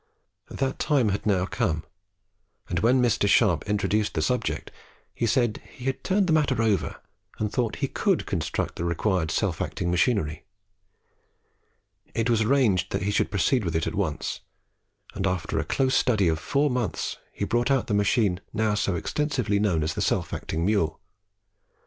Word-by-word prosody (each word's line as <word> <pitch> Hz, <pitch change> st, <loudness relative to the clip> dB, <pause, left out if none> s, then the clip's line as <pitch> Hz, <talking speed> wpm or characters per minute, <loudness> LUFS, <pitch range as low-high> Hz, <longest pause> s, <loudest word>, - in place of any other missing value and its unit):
That 135 Hz, -1 st, -2 dB
time 140 Hz, -8 st, +2 dB
had 100 Hz, +2 st, -2 dB
now 95 Hz, -3 st, +2 dB
come; 95 Hz, -8 st, -1 dB, 0.8 s
and 85 Hz, -, -1 dB
when 125 Hz, +4 st, +3 dB
Mr. 115 Hz, -4 st, +2 dB
Sharp 100 Hz, -6 st, +3 dB
introduced 105 Hz, +1 st, 0 dB
the 80 Hz, -, +1 dB
subject, -, -, -1 dB, 0.4 s
he 115 Hz, -, -1 dB
said 120 Hz, -1 st, +1 dB
he 125 Hz, -, -11 dB
had 135 Hz, -1 st, -2 dB
turned 195 Hz, +1 st, +2 dB
the 165 Hz, -, +2 dB
matter 145 Hz, -6 st, +2 dB
over 105 Hz, -6 st, +1 dB, 0.4 s
and 105 Hz, -1 st, -2 dB
thought 120 Hz, -4 st, 0 dB
he -, -, -2 dB
could 195 Hz, +5 st, 0 dB
construct 85 Hz, -5 st, -2 dB
the -, -, -3 dB
required 85 Hz, 0 st, 0 dB
self -, -, -1 dB
acting 85 Hz, -1 st, -2 dB
machinery. 90 Hz, -5 st, +1 dB, 1.7 s
It 115 Hz, +1 st, +1 dB
was 115 Hz, -1 st, +3 dB
arranged 110 Hz, -7 st, +2 dB
that -, -, -1 dB
he 100 Hz, -, 0 dB
should -, -, +1 dB
proceed 110 Hz, +5 st, +1 dB
with 85 Hz, -3 st, -2 dB
it 80 Hz, -, +1 dB
at -, -, -3 dB
once, 90 Hz, -9 st, -2 dB, 0.7 s
and 95 Hz, 0 st, -1 dB
after 90 Hz, -2 st, -1 dB
a -, -, 0 dB
close 130 Hz, -1 st, 0 dB
study 110 Hz, -7 st, +3 dB
of 80 Hz, -1 st, 0 dB
four 140 Hz, -, +1 dB
months 120 Hz, -9 st, -2 dB
he 100 Hz, -, -3 dB
brought 120 Hz, +4 st, +1 dB
out 135 Hz, -3 st, +2 dB
the 105 Hz, -, -2 dB
machine 100 Hz, -2 st, +2 dB
now 110 Hz, -1 st, +1 dB
so 100 Hz, -3 st, 0 dB
extensively 125 Hz, -, -1 dB
known 90 Hz, -7 st, +1 dB
as 80 Hz, +1 st, -1 dB
the -, -, -3 dB
self -, -, 0 dB
acting 80 Hz, +1 st, -2 dB
mule. 90 Hz, -7 st, +1 dB
105 Hz, 175 wpm, -26 LUFS, 90-125 Hz, 1.7 s, when